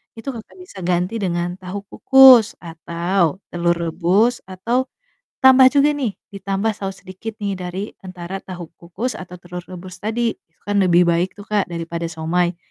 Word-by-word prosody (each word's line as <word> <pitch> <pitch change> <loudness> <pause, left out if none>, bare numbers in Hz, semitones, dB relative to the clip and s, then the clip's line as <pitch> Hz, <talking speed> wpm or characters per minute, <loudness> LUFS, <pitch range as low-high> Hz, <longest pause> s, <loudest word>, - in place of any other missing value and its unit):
itu 225 +4 -12
Kakak 225 -3 -11
bisa 365 - -11
ganti 180 +5 0
dengan 175 -2 -2
tahu 190 +2 -6
kukus 260 -5 +7
atau 170 +2 -1
telur 175 0 +1
rebus, 175 +8 +1
atau 235 +8 -1 0.6
tambah 260 0 +8
juga 290 +2 +3
nih, 260 -8 -3 0.2
ditambah 200 +2 -1
saos 195 -2 -7
sedikit 210 +4 -8
nih 200 -1 -2
dari 180 +3 -4 0.2
antara 185 0 -7
tahu 175 -3 -9
kukus 195 +9 -4
atau 180 -2 -9
telur 175 0 -8
rebus 185 0 -10
tadi 225 +2 -1
itu 165 - -32
kan 205 0 +1
lebih 180 -1 +4
baik 170 +3 0
tuh 205 - -10
Kak, 210 -3 0
daripada 170 0 -4
siomay. 170 +2 -1
185 Hz, 160 wpm, -20 LUFS, 175-215 Hz, 0.6 s, tambah